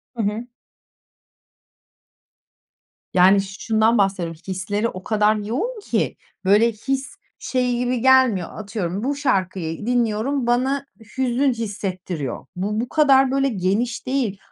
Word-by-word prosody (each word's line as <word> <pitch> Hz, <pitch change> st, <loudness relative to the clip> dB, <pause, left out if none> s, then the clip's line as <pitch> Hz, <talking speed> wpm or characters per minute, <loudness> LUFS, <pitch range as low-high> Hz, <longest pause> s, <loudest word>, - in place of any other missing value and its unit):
Hı 225 Hz, -, -1 dB
hı. 215 Hz, +4 st, -2 dB, 2.7 s
Yani 190 Hz, +2 st, +6 dB
ş 195 Hz, 0 st, -8 dB
şundan 220 Hz, +1 st, +3 dB
bahsediyorum, 180 Hz, -5 st, 0 dB
hisleri 205 Hz, +4 st, -1 dB
o 185 Hz, -4 st, -7 dB
kadar 215 Hz, 0 st, +2 dB
yoğun 260 Hz, -, -3 dB
ki, 405 Hz, -, -1 dB, 0.3 s
böyle, 210 Hz, +4 st, +5 dB
his 270 Hz, -, -3 dB, 0.2 s
şey 250 Hz, -2 st, 0 dB
gibi 245 Hz, -1 st, -1 dB
gelmiyor, 260 Hz, -9 st, +4 dB
atıyorum 200 Hz, -2 st, -4 dB
bu 280 Hz, +2 st, 0 dB
şarkıyı 185 Hz, -, -1 dB
dinliyorum, 240 Hz, +2 st, 0 dB
bana 260 Hz, +4 st, +1 dB, 0.3 s
hüzün 260 Hz, +1 st, +2 dB
hissettiriyor. 185 Hz, -, -4 dB
Bu, 205 Hz, +4 st, -2 dB
bu 240 Hz, +2 st, -3 dB
kadar 270 Hz, -4 st, +4 dB
böyle 275 Hz, 0 st, +2 dB
geniş 215 Hz, +3 st, -1 dB
değil. 250 Hz, -7 st, 0 dB
225 Hz, 120 wpm, -22 LUFS, 195-255 Hz, 2.7 s, Yani